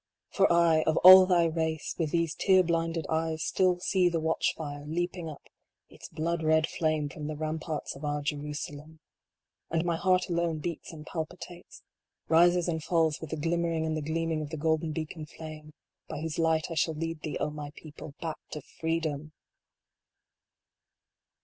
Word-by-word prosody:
For 195 - +3
I, 170 -2 +4
of 160 - +2
all 185 0 +11
thy 175 -2 +4
race, 160 -1 -1
with 160 -3 0
these 165 -1 0
tear 185 +1 +4
blinded 165 -1 -1
eyes, 160 -1 -1
still 180 -1 +2
see 185 -1 +2
the 170 -1 -1
watch 160 +1 0
fire 145 -2 -6
leaping 175 +1 -3
up 150 - -10 0.5
its - - -12
blood 165 +1 -2
red 160 0 +3
flame 155 -3 -1
from 150 0 -7
the 155 - -4
ramparts 155 0 -4
of 135 - -11
our 145 0 -2
Jerusalem! 150 +1 -5 0.7
And 165 +1 0
my 170 -1 0
heart 185 +1 +2
alone 170 -2 0
beats 165 +2 -5
and 155 -2 -10
palpitates, 175 +2 -7 0.4
rises 175 +2 +4
and 160 -2 -2
falls 160 -3 +1
with 160 - -7
the 160 - -3
glimmering 165 +1 0
and 160 0 -1
the 155 - -2
gleaming 160 +1 -1
of 150 - -5
the 160 - -5
golden 160 +1 0
beacon 155 0 -5
flame, 155 -1 -10 0.4
by - - -5
whose 160 0 -4
light 160 0 +1
I - - -1
shall 160 0 0
lead 165 0 -4
thee, 155 - -4
O 150 - -1
my 150 -1 -6
people! 150 -2 -11
back 160 -2 -4
to 150 - -5 0.2
freedom 155 -2 -2
160 Hz, 175 wpm, -29 LUFS, 155-170 Hz, 0.7 s, all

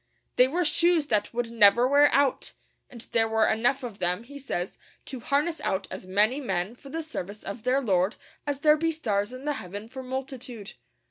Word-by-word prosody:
They 250 - +6
were 345 +6 0
shoes 335 0 +3
that 210 -2 +1
would 240 -1 -3
never 235 +2 +6
wear 285 +2 +5
out; 280 -1 +1 0.4
and 240 -3 -9
there 225 -1 +3
were 220 0 +2
enough 245 +5 +1
of 230 -5 -7
them, 180 +4 +1
he 285 +4 -11
says, 185 -9 -4 0.3
to 265 - -7
harness 290 +7 0
out 190 0 -2
as 185 - -7
many 210 +9 +2
men 195 -5 -2
for 275 +3 -14
the 325 +3 -4
service 210 - -7
of 200 +3 -6
their 255 +4 +1
Lord 190 -3 +1 0.3
as 285 -1 -2
there 300 0 +5
be 330 +2 0
stars 210 -9 -1
in 255 +2 -9
the 295 - 0
heaven 200 +4 -8
for 260 +3 -8
multitude. 255 -4 -6
245 Hz, 200 wpm, -26 LUFS, 210-280 Hz, 0.4 s, They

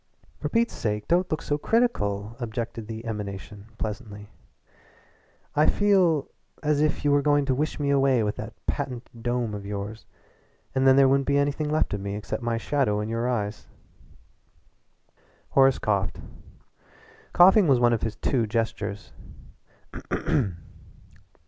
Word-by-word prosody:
"For - - -3
Pete's 235 +1 +1
sake, 105 -1 -3
don't 180 +2 +2
look 155 - -2
so 145 0 -1
critical!" 110 - 0
objected 115 -1 -5
the 115 0 -7
emanation 100 -2 -6
pleasantly. 105 -1 -6 1.2
"I 150 - +4
feel 185 -8 +3 0.4
as 150 -1 +2
if 155 -1 0
you 145 - +4
were 145 0 +4
going 145 0 +2
to 135 - +1
wish 150 +4 -2
me 140 -1 +1
away 135 -4 +3
with 105 0 -1
that - - -6
patent 125 -1 -3
dome 120 -2 -1
of 100 -1 -5
yours. 105 +2 -6 0.7
And 130 0 +2
then 130 - +7
there 135 0 +6
wouldn't 135 0 +2
be 140 0 +3
anything 145 +1 0
left 155 -6 +1
of 105 - -3
me 100 0 -4
except 105 +3 -4
my 115 -1 -1
shadow 120 -5 0
in 105 +1 -3
your 115 +2 -1
eyes." 105 -3 -3 1.8
Horace 135 -1 +4
coughed. 100 -3 -1 1.1
Coughing 190 +2 +6
was 135 -4 +4
one 120 -1 +4
of 115 - 0
his 115 -2 -2
two 120 -5 0
gestures. 105 -2 -3
120 Hz, 145 wpm, -26 LUFS, 105-145 Hz, 1.8 s, then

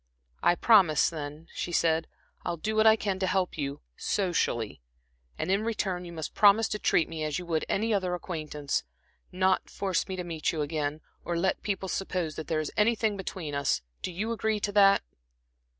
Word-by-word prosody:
"I 175 - +4
promise, 185 -7 +5
then," 150 0 -7
she 175 - -4
said. 165 -1 +2 0.4
"I'll 170 -1 -2
do 215 +7 -2
what 220 0 +5
I 220 - +8
can 200 -3 -2
to 190 - 0
help 185 -1 0
you 140 -2 -4
socially, 140 - -1 0.6
and - - -1
in 195 +2 +2
return 195 -5 -2
you 170 - -8
must 160 -2 -5
promise 210 +2 +6
to 210 - -2
treat 165 - +2
me 160 -1 -5
as 155 -1 -1
you 180 - -5
would 160 -2 -1
any 220 +2 +1
other 185 -3 0
acquaintance 155 -5 -3 0.5
not 185 +1 +1
force 190 -3 -1
me 190 - -4
to 180 - -4
meet 165 -3 -1
you 155 -2 -1
again, 150 0 -2 0.2
or 175 - -2
let 190 +3 0
people 195 -2 -2
suppose 180 -4 -2
that 155 - -6
there 160 - 0
is 155 - -3
anything 220 0 +2
between 185 -5 -5
us. 140 - 0 0.2
Do - - -3
you 210 +6 -3
agree 220 -2 0
to 205 - -1
that?" 200 -1 +5
180 Hz, 195 wpm, -28 LUFS, 160-200 Hz, 0.6 s, I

